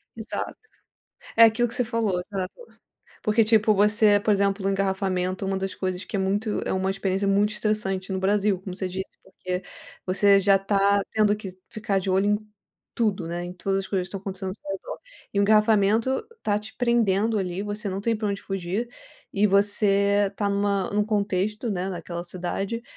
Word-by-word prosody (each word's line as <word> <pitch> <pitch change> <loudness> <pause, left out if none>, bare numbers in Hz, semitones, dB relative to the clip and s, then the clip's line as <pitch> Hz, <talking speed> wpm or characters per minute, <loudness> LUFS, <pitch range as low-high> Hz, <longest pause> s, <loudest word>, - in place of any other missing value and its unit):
Exato. 220 0 -5 0.8
É 230 - +8
aquilo 230 +2 +5
que 230 - -8
você 250 - +2
falou, 220 -5 0
exato. 185 0 -5 0.7
Porque, 215 +1 +3
tipo, 215 -1 +4
você, 210 +1 +4
por 210 - +2
exemplo, 200 0 +1
no 195 - +2
engarrafamento, 190 -1 -1
uma 195 0 -1
das 195 0 -3
coisas 185 0 -3
que 205 - -4
é - - 0
muito 205 +3 0
é - - -2
uma 190 0 0
experiência 195 0 -1
muito 200 +1 +3
estressante 210 -3 -1
no 190 - -1
Brasil, 200 0 +2
como 185 -1 -7
você 190 -1 -3
disse, 190 +1 -6
porque 185 -1 -5 0.4
você 200 +1 +4
já 195 0 +4
tá 200 0 +2
tendo 210 -1 +2
que 190 -3 -9
ficar 205 -2 -1
de 190 0 -2
olho 190 +2 +2
em 210 0 +3 0.6
tudo, 205 -7 0
né, 175 +1 -3
em 175 - -6
todas 195 +2 -1
as 195 - -7
coisas 185 -3 -1
que - - -9
estão 195 +1 -6
acontecendo 190 -1 -5
seu 200 -2 -9
redor. 195 - -6 0.3
E 200 - -1
o - - +4
engarrafamento 215 - +3 0.2
tá 205 -1 +1
te 210 +1 -11
prendendo 225 -3 +2
ali, 185 0 -2
você 210 +1 -4
não 190 +1 -3
tem 230 +2 0
pra 210 -1 -2
onde 200 -1 -3
fugir. 195 +4 -3 0.4
E 205 +1 +3
você 200 0 +3
tá 205 - 0
numa 200 -1 0
num 210 0 +1
contexto, 210 +1 -1
né, 185 -1 -2
naquela 170 -1 -5
cidade 190 +6 -4
200 Hz, 190 wpm, -25 LUFS, 190-210 Hz, 0.8 s, É